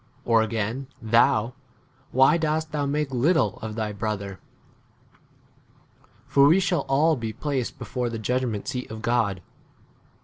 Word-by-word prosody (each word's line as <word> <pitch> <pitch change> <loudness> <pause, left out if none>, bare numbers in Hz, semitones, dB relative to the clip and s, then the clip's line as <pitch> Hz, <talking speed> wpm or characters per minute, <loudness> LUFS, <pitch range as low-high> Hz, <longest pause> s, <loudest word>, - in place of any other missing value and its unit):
or 115 -1 +4
again, 110 +4 -2
thou, 115 0 +3 0.6
why 135 +4 +5
dost 155 -1 -1
thou 145 -2 -1
make 145 0 -1
little 130 - +1
of 110 -1 -5
thy 110 -1 -2
brother? 100 -2 -4 1.9
for 140 0 +5
we 165 +6 +5
shall 180 -6 0
all 155 +4 +3
be 115 -4 -4
placed 135 0 -3
before 125 -2 -3
11 - - -4
the - - -10
judgment 125 -5 -1
seat 125 -2 -4
of 110 +1 -8
God. 105 -6 0
125 Hz, 140 wpm, -25 LUFS, 110-145 Hz, 1.9 s, why